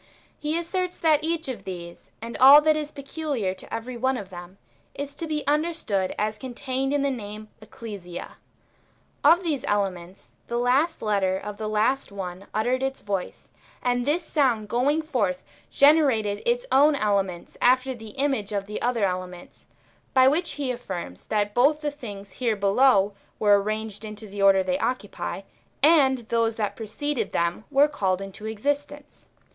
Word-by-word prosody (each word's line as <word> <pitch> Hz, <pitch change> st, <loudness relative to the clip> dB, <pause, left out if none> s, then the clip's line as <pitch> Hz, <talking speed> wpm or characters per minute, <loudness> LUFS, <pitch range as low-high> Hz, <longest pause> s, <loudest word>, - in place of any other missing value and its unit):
He 305 Hz, +2 st, -1 dB
asserts 360 Hz, +2 st, -2 dB
that 310 Hz, -2 st, +3 dB
each 330 Hz, -1 st, -1 dB
of 235 Hz, -7 st, -5 dB
these, 175 Hz, -2 st, -8 dB
and 230 Hz, 0 st, -6 dB
all 275 Hz, +3 st, +10 dB
that 310 Hz, 0 st, +3 dB
is 300 Hz, -1 st, -3 dB
peculiar 280 Hz, -, -3 dB
to 190 Hz, -, -12 dB
every 240 Hz, +2 st, -5 dB
one 260 Hz, +2 st, +1 dB
of 195 Hz, -4 st, -8 dB
them, 175 Hz, +1 st, -10 dB, 0.4 s
is 285 Hz, 0 st, -5 dB
to 325 Hz, +3 st, -5 dB
be 305 Hz, -2 st, -2 dB
understood 295 Hz, -, 0 dB
as 215 Hz, 0 st, -1 dB
contained 260 Hz, +2 st, -3 dB
in 290 Hz, -1 st, +1 dB
the 280 Hz, -, +1 dB
name 215 Hz, -3 st, -7 dB
Ecclesia. 200 Hz, -6 st, -9 dB, 0.9 s
Of 345 Hz, +3 st, +6 dB
these 300 Hz, -6 st, -1 dB
elements, 190 Hz, -3 st, -2 dB, 0.2 s
the 235 Hz, -, -2 dB
last 265 Hz, +7 st, +1 dB
letter 195 Hz, -3 st, +1 dB
of 210 Hz, +1 st, -7 dB
the 215 Hz, -, -4 dB
last 215 Hz, +4 st, +1 dB
one 190 Hz, -1 st, -7 dB
uttered 245 Hz, +4 st, 0 dB
its 270 Hz, 0 st, -2 dB
voice, 195 Hz, -3 st, -5 dB, 0.3 s
and 245 Hz, 0 st, +1 dB
this 305 Hz, +6 st, 0 dB
sound 250 Hz, -10 st, +1 dB
"^ 240 Hz, +1 st, +1 dB
goii^g 310 Hz, +2 st, +1 dB
forth 205 Hz, -, -1 dB, 0.3 s
generated 270 Hz, -9 st, +4 dB
its -, -, +1 dB
own 290 Hz, +2 st, +5 dB
elements 200 Hz, -7 st, -1 dB
after 255 Hz, +1 st, +3 dB
the 220 Hz, -3 st, -11 dB
image 265 Hz, -7 st, 0 dB
of 200 Hz, -1 st, -2 dB
the 210 Hz, +1 st, -6 dB
[other] 235 Hz, -4 st, +1 dB
elements, 180 Hz, -1 st, -6 dB, 0.5 s
by 260 Hz, 0 st, +7 dB
which 330 Hz, +5 st, +1 dB
he 280 Hz, -3 st, -2 dB
affirms, 185 Hz, -, -6 dB
that 205 Hz, -1 st, 0 dB
both 285 Hz, +6 st, +3 dB
the 295 Hz, -1 st, -1 dB
things 205 Hz, -8 st, -9 dB
here 235 Hz, -4 st, -1 dB
below 200 Hz, 0 st, +3 dB, 0.2 s
were 205 Hz, -1 st, +4 dB
arrane^ed 215 Hz, 0 st, -4 dB
into 215 Hz, 0 st, -8 dB
the 200 Hz, -1 st, -6 dB
order 195 Hz, -1 st, +5 dB
thev 185 Hz, 0 st, -1 dB
occupy, 210 Hz, -5 st, -3 dB, 0.4 s
and 265 Hz, -6 st, +4 dB
those 230 Hz, -1 st, +1 dB
that 210 Hz, -2 st, -2 dB
preceded 230 Hz, +2 st, -3 dB
them 170 Hz, +5 st, -1 dB
were 285 Hz, +1 st, +5 dB
called 190 Hz, -11 st, -1 dB
into 195 Hz, +2 st, -8 dB
exist 285 Hz, +7 st, -1 dB
ence. 290 Hz, 0 st, -14 dB
230 Hz, 170 wpm, -25 LUFS, 200-285 Hz, 0.9 s, all